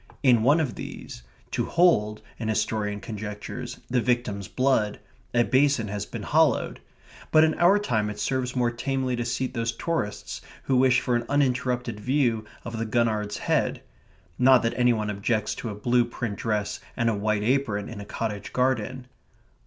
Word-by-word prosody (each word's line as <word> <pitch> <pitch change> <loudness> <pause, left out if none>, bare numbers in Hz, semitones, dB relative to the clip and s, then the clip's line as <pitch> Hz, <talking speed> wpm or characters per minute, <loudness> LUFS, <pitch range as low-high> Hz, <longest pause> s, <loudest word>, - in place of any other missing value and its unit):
In 125 -4 +5
one 145 +8 +4
of 150 -6 -1
these, - - -8 0.3
to - - 0
hold, 110 -12 +3 0.2
an 115 - -3
historian 105 -1 -1
conjectures, 105 -1 -6
the 125 -1 +1
victim's 120 -5 -1
blood, 130 -6 +1 0.3
a 120 -1 +3
basin 130 -1 +2
has 105 0 -4
been - - -6
hollowed, - - +2 0.5
but 155 - +6
in 160 0 +3
our 180 +4 +6
time 110 - 0
it 105 0 -6
serves 130 +1 -1
more 120 -1 +2
tamely 130 +1 -1
to 120 - -2
seat 125 +2 -2
those 115 -2 -1
tourists 115 -3 -3 0.2
who 130 - +2
wish 130 -1 +4
for 125 - 0
an 120 0 -1
uninterrupted 125 -5 0
view 120 -2 +1 0.2
of 115 -1 -5
the 115 - -1
Gurnard's 110 -3 0
Head. - - 0 0.6
Not 130 0 +6
that 115 - +1
any 125 0 +4
one 105 -2 -1
objects 105 +2 -1
to 115 - -5
a 105 - -5
blue 120 +4 +2
print 120 -3 -4
dress 105 -1 -2 0.2
and 120 -2 +1
a 115 - +3
white 105 0 0
apron 115 -4 0
in 110 -3 -7
a - - -6
cottage 105 -1 -4
garden. 130 0 0
120 Hz, 175 wpm, -26 LUFS, 105-130 Hz, 0.6 s, but